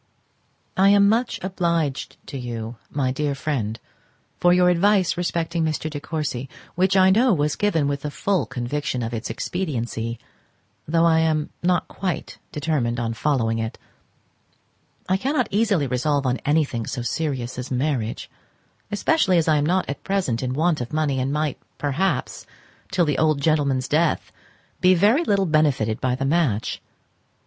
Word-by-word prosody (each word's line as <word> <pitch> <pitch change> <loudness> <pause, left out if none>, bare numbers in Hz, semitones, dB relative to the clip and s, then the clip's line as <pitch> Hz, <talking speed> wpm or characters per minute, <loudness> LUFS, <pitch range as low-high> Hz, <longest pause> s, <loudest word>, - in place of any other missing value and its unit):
I 195 +1 +5
am 200 0 +6
much 230 +4 +1
obliged 170 -6 -1
to - - -8
you, 115 -1 -5
my 135 -3 0
dear 145 +1 -1
Friend, 120 -7 -2 0.6
for 175 - +4
your 180 0 +5
advice 190 +1 +3
respecting 170 -1 -1
Mr. 155 0 -2
De 145 - -4
Courcy, 145 -4 -4 0.2
which 190 +2 +2
I 190 0 +6
know 230 +1 +4
was 150 -1 0
given 165 -9 +1
with 140 -1 -2
the 150 - -3
full 190 +5 0
conviction 125 0 -3
of 115 +1 -4
its 115 -1 -4
expediency, 120 -9 -3 0.7
though 165 +2 +3
I 160 -1 +4
am 155 -2 +1
not 180 0 +1
quite 185 -3 -4
determined 140 -6 -1
on 115 -1 -1
following 115 -3 0
it. 110 0 -4 1.3
I 185 - +2
cannot 260 +2 0
easily 205 -7 +2
resolve 140 +2 0
on 130 0 +1
anything 145 -7 +1
so 125 - -3
serious 130 -2 -2
as 125 - -5
marriage; 125 -3 -1 0.6
especially 205 - +2
as 165 - +2
I 155 -1 +4
am 145 - +1
not 185 +2 +1
at 140 - -5
present 190 -13 0
in 130 0 -2
want 160 -1 +1
of 120 - -5
money, 150 -3 0
and 130 +2 -1
might 150 -1 -1 0.2
perhaps, 145 +7 -1 0.4
till 185 -2 +2
the 150 - 0
old 155 -2 +3
gentleman's 140 -4 +1
death, 155 +2 +1 0.5
be 185 +1 +5
very 215 - +4
little 200 - +2
benefited 145 -9 +1
by 125 -1 +1
the 135 +1 -2
match. 135 -8 0
150 Hz, 160 wpm, -23 LUFS, 130-180 Hz, 1.3 s, am